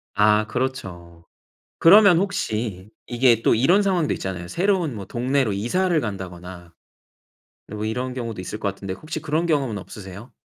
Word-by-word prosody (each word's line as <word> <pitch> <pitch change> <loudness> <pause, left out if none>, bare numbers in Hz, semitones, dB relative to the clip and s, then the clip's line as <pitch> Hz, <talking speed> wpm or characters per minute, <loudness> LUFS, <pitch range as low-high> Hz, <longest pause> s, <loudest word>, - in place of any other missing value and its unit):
아 105 +1 +3
그렇죠. 90 -10 -5 0.5
그러면 195 +1 +7
혹시 110 - -2 0.2
이게 120 -2 +3
또 - - +3
이런 170 - +4
상황도 185 -6 +1
있잖아요. 90 -2 -5
새로운 175 - 0
뭐 100 - -7
동네로 125 -1 0
이사를 165 - 0
간다거나 90 -4 -7 1.0
뭐 105 +1 -5
이런 125 +3 -3
경우도 115 -6 -5
있을 105 +4 -6
것 100 - -1
같은데 95 -1 -6
혹시 155 +9 -6
그런 155 +3 -1
경험은 135 -9 0
없으세요? 100 +3 -10
115 Hz, 330 characters per minute, -22 LUFS, 95-155 Hz, 1.0 s, 그러면